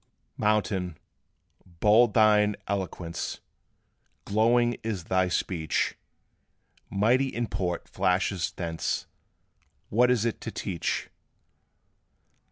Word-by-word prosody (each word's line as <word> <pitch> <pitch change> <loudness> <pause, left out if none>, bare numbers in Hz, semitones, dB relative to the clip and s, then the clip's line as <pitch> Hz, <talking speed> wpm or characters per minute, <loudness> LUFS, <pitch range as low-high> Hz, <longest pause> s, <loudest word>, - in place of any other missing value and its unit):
Mountain, 100 -5 0 0.7
bold 105 +6 +3
thine 105 -2 +5
eloquence 90 -4 -3 0.9
Glowing 120 +3 +3
is 110 -6 -3
thy 95 +1 +1
speech; 85 -3 -1 0.9
Mighty 120 +7 +2
import 95 -7 -2
flashes 95 -1 0
thence; 85 -3 -3 0.8
What 125 +4 +4
is 120 -3 +2
it 115 - -2
to - - -4
teach? 95 -6 -3
100 Hz, 80 wpm, -27 LUFS, 90-110 Hz, 0.9 s, thine